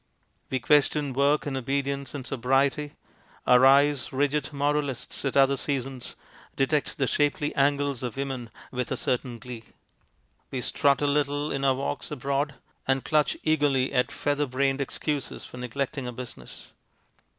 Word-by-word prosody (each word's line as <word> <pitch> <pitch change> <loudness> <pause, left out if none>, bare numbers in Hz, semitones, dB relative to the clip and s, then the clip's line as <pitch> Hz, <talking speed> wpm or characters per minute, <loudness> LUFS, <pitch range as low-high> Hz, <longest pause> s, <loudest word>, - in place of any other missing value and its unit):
We 130 - 0
question 145 +1 +3
work 140 +3 +2
and 140 -2 -2
obedience 140 +2 -2
and 135 -3 -5
sobriety. 135 +3 +1 0.5
Our 125 0 +6
eyes, 140 0 +4
rigid 145 +1 0
moralists 145 -2 -1
at 135 - 0
other 135 0 +5
seasons, 135 -2 -3 0.4
detect 140 +2 0
the 140 - +2
shapely 145 +2 +1
angles 140 -2 +1
of 125 -1 -4
women 135 -4 -3 0.2
with 125 -1 -3
a 130 - 0
certain 125 -1 -1
glee. 115 0 -8 0.9
We 130 - -3
strut 140 +3 +2
a - - +3
little 145 0 +1
in 135 0 -2
our 135 -1 +4
walks 135 - -3
abroad, 140 +1 -1 0.3
and 135 0 +1
clutch 150 -3 +2
eagerly 145 -4 +2
at 125 -1 +2
feather 145 0 0
brained 135 +1 +1
excuses 145 +1 -3
for - - -11
neglecting 130 +2 -3
our 125 - -5
business. 125 0 -10
140 Hz, 150 wpm, -27 LUFS, 130-145 Hz, 0.9 s, Our